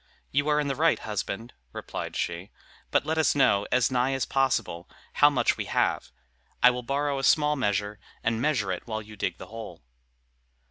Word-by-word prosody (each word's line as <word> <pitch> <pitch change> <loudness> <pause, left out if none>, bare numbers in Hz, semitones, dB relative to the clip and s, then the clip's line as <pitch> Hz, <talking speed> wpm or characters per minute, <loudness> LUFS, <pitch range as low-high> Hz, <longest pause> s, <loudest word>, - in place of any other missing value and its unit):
"You 145 +2 +1
are 150 0 +3
in 150 - -1
the 135 - -1
right, 160 +2 +3
husband," 105 +2 -5 0.2
replied - - -6
she; 85 +3 -3 0.4
"but - - +1
let 160 +1 0
us 160 - +3
know, 100 -8 +3
as 125 0 +3
nigh 125 +1 +1
as 135 - -1
possible, 120 -10 -1 0.2
how 145 - +6
much 125 -5 +1
we - - -3
have. - - 0 0.5
I 125 - +9
will 125 0 -4
borrow 140 +2 -1
a - - -5
small 150 0 +4
measure, 105 -4 -1 0.2
and 115 0 0
measure 125 -10 +1
it 90 - -5
while 110 -1 -4
you 105 0 -12
dig 95 -3 -3
the - - -9
hole." 115 - -8
125 Hz, 190 wpm, -27 LUFS, 105-140 Hz, 0.5 s, I